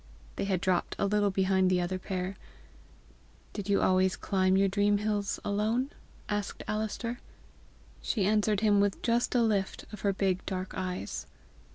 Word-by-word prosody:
They - - -2
had 190 -3 0
dropped 185 -2 0
a - - +1
little 205 0 +2
behind 190 -1 +2
the 180 -1 +3
other 180 +1 -2
pair. 185 0 -3 1.2
"Did 205 -1 -5
you 200 - +3
always 185 0 +3
climb 190 -1 +2
your 195 0 +4
dream 205 +1 +2
hills 205 -1 -1
alone?" 220 +6 0 0.4
asked 205 -1 -3
Alister. 220 +3 -2 0.8
She 205 -5 0
answered 210 0 +2
him 210 -2 +4
with 200 -1 +1
just 240 +1 +1
a 240 - +4
lift 205 -4 0
of 210 - -7
her 200 - +2
big 190 -1 0
dark 185 -1 -3
eyes. 180 - -4
200 Hz, 160 wpm, -30 LUFS, 185-210 Hz, 1.2 s, your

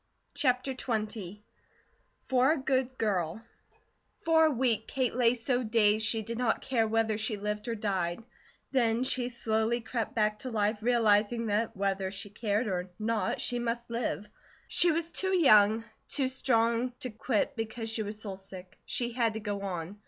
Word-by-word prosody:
CHAPTER 265 -2 +1
XX 215 -5 -4 0.7
"FOR 260 +3 +2
A - - -2
GOOD 260 -1 -1
GIRL" 195 -1 -1 0.7
FOR 320 -1 +4
a - - +4
week, 235 -5 0
Kate 255 -3 -1
lay 245 -1 +3
so 245 +1 0
dazed 215 -2 +3
she 220 0 +1
did 230 +2 -5
not 245 -3 0
care 235 -4 +1
whether 220 -1 +1
she 215 0 -1
lived 210 +2 -4
or 230 - -1
died; 195 -2 -2 0.5
then 235 -2 +2
she 255 -1 0
slowly 225 0 0
crept 230 -1 -4
back 210 -1 +1
to 255 - -5
life, 210 -1 0
realizing 230 -1 +2
that 220 +1 -1
whether 195 -1 -1
she 195 +1 -6
cared 210 +2 -1
or 185 -3 -2
not, 215 -3 -1
she 245 - 0
must 235 0 -3
live. 230 -3 -2 0.4
She 345 - +5
was 335 +1 -2
too 380 +3 +1
young, 215 -6 +6 0.3
too 265 -2 0
strong, 235 -1 +1
to 255 - -4
quit 225 +5 -1
because 225 0 -4
she 225 - -2
was 210 0 -5
soul 195 -3 -5
sick; 185 -1 -12
she 240 -1 -1
had 230 -2 0
to - - -2
go 205 -2 -4
on. 185 0 -5
225 Hz, 170 wpm, -30 LUFS, 210-245 Hz, 0.7 s, young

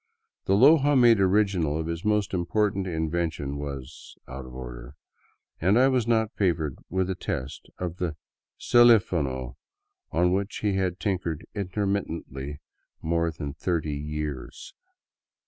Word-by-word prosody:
The 95 - +3
Loja 140 +3 +6
made 120 -3 +6
original 95 -6 +2
of 80 - -2
his 85 +1 -4
most 105 -2 +1
important 95 +2 0
in 80 -3 -2
vention 80 -5 -2
was 70 -3 -8
out 65 0 -8
of 65 - -11
order, - - -8 0.6
and 95 +6 +3
I 130 +2 +5
was 125 -4 +1
not 110 -2 +2
favored 85 -8 0
with 95 0 0
a - - 0
test 70 -6 -5
of 90 -1 -4
the 85 -4 -2 0.2
" - - -60
celifono 80 - +4 0.3
" 400 -3 -53
on 90 0 +2
which 100 +2 -2
he 105 -2 +2
had 95 -1 -1
tinkered 90 -6 -2
intermittently 90 -8 -3 0.4
more 85 +1 +1
than 75 -3 -6
thirty 80 +1 -2
years. 75 -2 -5
90 Hz, 145 wpm, -26 LUFS, 75-100 Hz, 0.6 s, Loja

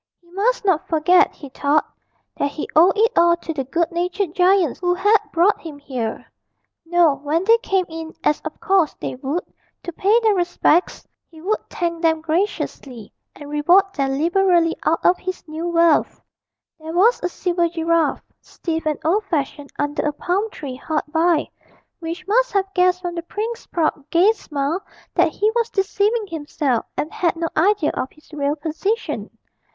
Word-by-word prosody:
He 345 -1 -26
must 420 +5 0
not 370 -6 +1
forget, 345 +3 +4
he 285 - -10
thought, 285 +3 +1 0.5
that 285 - 0
he 305 - -5
owed 350 +6 +5
it 450 +3 +4
all 340 0 +4
to 330 - -5
the 275 -3 -2
good 335 +7 -1
natured 355 +1 -2
giants 365 -5 +3
who 355 -1 +1
had 415 +4 +4
brought 355 +5 +2
him 315 -3 -8
here: 255 -6 -5 0.6
no, 345 -3 +4
when 300 +5 -1
they 455 +3 +5
came 385 -5 0
in 325 0 -7
as 300 - +1
of 310 - -7
course 380 -5 +2
they - - -5
would 275 +7 -3 0.4
to 345 - -6
pay 410 +7 +3
their 440 -2 +3
respects, 350 -2 +1 0.2
he 320 - -15
would 405 +7 -1
thank 335 -1 -3
them 320 -1 +2
graciously 310 - -3 0.2
and 290 - -10
reward 360 +7 +3
them 270 -4 -1
liberally 345 +1 +2
out 325 - 0
of 360 - +4
his 370 -2 -6
new 315 +2 -4
wealth. 335 -2 +2 0.6
There 320 +1 -7
was 425 +8 +4
a 355 - -1
silver 345 -1 0
giraffe, 330 -1 0 0.2
stiff 325 -2 -4
and 305 -2 0
old 400 +6 +2
fashioned, 290 -5 -3
under 290 0 -1
a 295 - -1
palm 375 +8 -1
tree 270 -10 -7
hard 305 +2 -2
by, 325 0 +2 0.5
which 345 +2 -6
must - - +2
have 390 -1 0
guessed 365 0 +2
from 350 -1 -3
the 340 - -4
prince's 445 +7 -5
proud 310 -4 -1
gay 360 +6 +5
smile 310 -4 -3 0.3
that - - +3
he 425 +1 +1
was 470 -1 +1
deceiving 415 +2 0
himself 290 - -2
and 305 - -3
had 340 -2 0
no 330 0 -2
idea 360 -1 +2
of 260 - -3
his 305 +1 -23
real 290 0 -1
position. 330 +9 -3
340 Hz, 175 wpm, -21 LUFS, 310-380 Hz, 0.6 s, owed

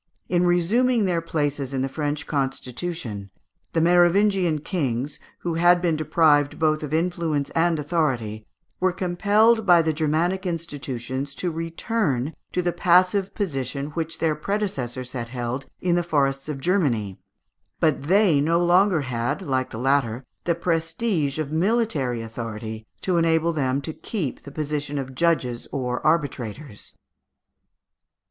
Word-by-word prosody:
In 180 0 +2
resuming 215 +7 +3
their 175 -3 +1
places 145 -4 -2
in 130 - 0
the - - 0
French 145 +1 -3
constitution, 135 - -3 0.4
the 165 - +2
Merovingian 175 0 +4
kings, 140 - -2 0.2
who 175 - -2
had 175 +2 +5
been 170 -2 +1
deprived 155 -2 +3
both 155 -1 +2
of 150 -2 -5
influence 165 -3 0
and 165 0 +2
authority, 130 -9 -1 0.3
were 185 0 +2
compelled 205 +6 +3
by 175 -4 +6
the 160 0 +1
Germanic 165 +5 0
institutions 140 -5 -4
to 180 - -2
return 165 - -1 0.2
to 180 - -1
the 175 - +1
passive 185 +2 +3
position 140 - -3
which 165 +1 -4
their 160 -2 +1
predecessors 135 - -3
had 120 -3 -5
held 125 +2 -4
in 180 -1 +1
the 175 - +3
forests 140 -4 0
of 145 -3 -4
Germany, 135 - 0 0.6
but 155 -3 +2
they 180 0 +4
no 165 +3 +2
longer 175 0 +4
had, 125 +6 -2
like 130 -5 -1
the - - -7
latter, 130 -1 +1 0.2
the 170 - +2
prestige 165 -2 -1
of 155 -2 -3
military 160 - +1
authority 110 -1 -6
to 185 -2 +1
enable 165 0 +2
them 135 -2 0
to 160 +2 -5
keep 170 - -4
the 140 - -11
position 150 -1 -3
of 135 -1 -4
judges 130 -7 0
or 125 -3 -2
arbitrators. 140 -6 -2
155 Hz, 140 wpm, -24 LUFS, 135-175 Hz, 0.6 s, by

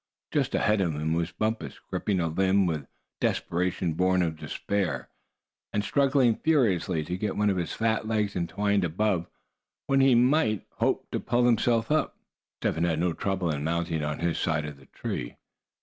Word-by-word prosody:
Just - - 0
ahead 105 -1 +2
of 85 -5 0
him 80 +2 -1
was 85 +1 -1
Bumpus, 110 +3 -2
gripping 100 -3 -2
a 85 - +1
limb 95 +4 +2
with 80 -4 -1
a 70 - -21 0.3
desperation 90 -1 0
born 90 +2 +2
of 80 -2 -1
despair, 80 +3 -2 0.6
and 105 - 0
struggling 135 -3 +3
furiously 95 - +2
to 90 +4 -3
get 105 -1 -2
one 105 0 +3
of 95 - -1
his 85 - -2
fat 110 -1 0
legs 105 -2 0
entwined 100 +3 0
above, 90 +1 0 0.6
when 135 0 +2
he 135 -2 +5
might 120 - +3
hope - - 0
to - - -1
pull 120 0 +1
himself 115 +1 +2
up. 155 - +1 0.4
Step - - +1
Hen 80 - -1
had 85 -2 +1
no 85 0 +1
trouble 95 -1 -1
in 70 -1 -3
mounting 85 -1 -1
on 75 0 -2
his 85 -1 -1
side 75 -2 0
of 75 -1 -7
the 70 - -19
tree. - - -5
95 Hz, 180 wpm, -27 LUFS, 80-110 Hz, 0.6 s, he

